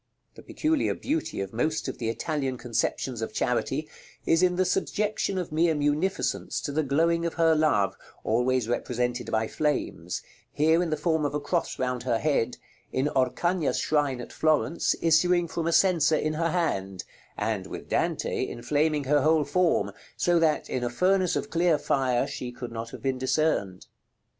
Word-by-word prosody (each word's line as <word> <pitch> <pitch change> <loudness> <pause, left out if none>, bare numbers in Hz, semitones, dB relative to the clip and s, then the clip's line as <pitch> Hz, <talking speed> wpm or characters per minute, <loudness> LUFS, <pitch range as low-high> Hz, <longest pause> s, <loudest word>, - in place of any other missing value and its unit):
The - - -13
peculiar 310 -1 0
beauty 310 - -2
of 95 +1 -5
most 155 +7 -1
of 130 - -5
the 115 -2 -1
Italian 135 +1 -2
conceptions 120 0 -2
of 110 - -4
Charity, 135 +5 -1 0.4
is 165 - +3
in 180 -1 +3
the 185 +1 +2
subjection 205 0 -1
of 180 -4 -3
mere 160 +1 +2
munificence 150 +6 0
to 145 - -4
the 155 +2 +1
glowing 165 +4 +1
of 170 - -2
her 165 -1 +4
love, 145 -11 +2 0.3
always 125 +1 +1
represented 125 0 -2
by 110 0 0
flames; 135 - -2 0.3
here 160 +3 +3
in 175 - -1
the 155 - 0
form 160 -1 0
of 145 0 -1
a - - +1
cross 170 +4 -2
round 125 -1 -1
her 120 -2 0
head; 125 -3 0 0.3
in 135 +3 0
Oreagna's 145 +6 +1
shrine 145 -4 +1
at 120 - -8
Florence, 155 +1 +1
issuing 170 +2 +3
from 165 0 -3
a - - +2
censer 165 -4 +4
in 155 0 -1
her 165 +2 0
hand; 95 - -1 0.3
and, 105 -3 -2
with - - -8
Dante, - - -1
inflaming 145 +5 0
her 145 +2 +3
whole 155 +1 +3
form, 180 +2 +1 0.3
so 175 -1 +3
that, 155 -2 +1
in 125 - -2
a 120 - 0
furnace 185 +6 +2
of - - -3
clear 170 -2 +3
fire, 130 -4 +1
she 130 -3 -5
could 120 -1 -7
not 115 0 -5
have - - -10
been 135 -1 -1
discerned. 130 -9 0
150 Hz, 175 wpm, -27 LUFS, 125-165 Hz, 0.4 s, her